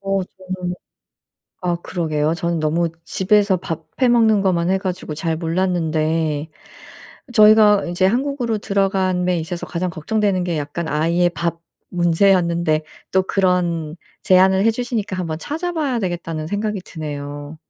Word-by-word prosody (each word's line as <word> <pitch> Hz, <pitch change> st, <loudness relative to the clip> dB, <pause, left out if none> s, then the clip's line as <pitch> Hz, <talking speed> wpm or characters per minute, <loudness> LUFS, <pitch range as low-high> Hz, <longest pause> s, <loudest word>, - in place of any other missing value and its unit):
어 195 Hz, 0 st, 0 dB
저는 185 Hz, -1 st, -6 dB, 0.9 s
아 175 Hz, -1 st, 0 dB
그러게요. 155 Hz, -4 st, -1 dB
저는 170 Hz, -1 st, -1 dB
너무 165 Hz, +2 st, +1 dB
집에서 200 Hz, 0 st, +2 dB
밥 165 Hz, -1 st, -6 dB
해 255 Hz, -2 st, +4 dB
먹는 220 Hz, -3 st, +4 dB
것만 180 Hz, -3 st, +1 dB
해 190 Hz, -, +3 dB
가지고 185 Hz, -5 st, -4 dB
잘 160 Hz, +1 st, -1 dB
몰랐는데 160 Hz, -3 st, 0 dB, 0.8 s
저희가 210 Hz, -2 st, +6 dB
이제 175 Hz, +2 st, -1 dB
한국으로 240 Hz, +1 st, 0 dB
들어감에 190 Hz, -3 st, 0 dB
있어서 170 Hz, +2 st, -5 dB
가장 180 Hz, +1 st, -3 dB
걱정되는 185 Hz, +3 st, 0 dB
게 170 Hz, -3 st, -1 dB
약간 150 Hz, +3 st, -4 dB
아이의 170 Hz, +4 st, +2 dB
밥 170 Hz, -1 st, -3 dB, 0.3 s
문제였는데 170 Hz, -2 st, +2 dB, 0.3 s
또 190 Hz, 0 st, +4 dB
그런 175 Hz, -4 st, 0 dB, 0.3 s
제안을 190 Hz, +1 st, +4 dB
해 225 Hz, -, +6 dB
주시니까 230 Hz, -4 st, -3 dB
‘한번 165 Hz, -4 st, -3 dB
찾아봐야 305 Hz, -, -2 dB
되겠다.‘는 165 Hz, -4 st, -3 dB
생각이 205 Hz, 0 st, -2 dB
드네요. 145 Hz, -1 st, -7 dB
180 Hz, 310 characters per minute, -20 LUFS, 165-195 Hz, 0.9 s, 저희가